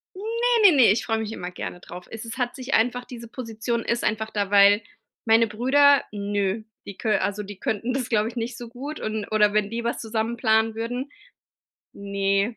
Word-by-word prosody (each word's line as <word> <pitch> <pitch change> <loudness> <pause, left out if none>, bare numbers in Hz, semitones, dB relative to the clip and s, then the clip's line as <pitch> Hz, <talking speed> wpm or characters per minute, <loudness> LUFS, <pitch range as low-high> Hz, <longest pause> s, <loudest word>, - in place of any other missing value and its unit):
Ne, 455 0 +3
ne, 300 - +2
ne, 245 -7 +7
ich 220 - -1
freu 225 -1 0
mich 220 0 -4
immer 180 -3 -6
gerne 180 0 -7
drauf. 175 +1 -10
Es 225 0 -7
ist 230 +1 -7
hat 245 -1 -1
sich 260 0 -4
einfach 245 +2 +1
diese 235 -2 -10
Position 230 -1 -3
ist 235 +1 -1
einfach 220 0 -1
da, 205 -2 -2
weil 205 +1 +6 0.4
meine 225 0 +5
Brüder 275 +6 +4
nö, 205 0 -2 0.2
die 200 - -9
kö 215 -2 +1
also 205 +1 -2
die 200 -1 -10
könnten 225 +5 -2
das, 255 -3 -2
glaube 215 0 +2
ich, 235 - -11
nicht 235 +1 -3
so 240 - -8
gut, 275 +6 -7
und 215 -1 -3
oder 210 -1 +3
wenn 210 -1 +1
die 230 +1 -4
was 235 - -2
zusammen 225 +1 -2
planen 220 -1 +2
würden 245 +5 -4 0.8
ne, 200 +2 -1
225 Hz, 205 wpm, -24 LUFS, 210-245 Hz, 0.8 s, ne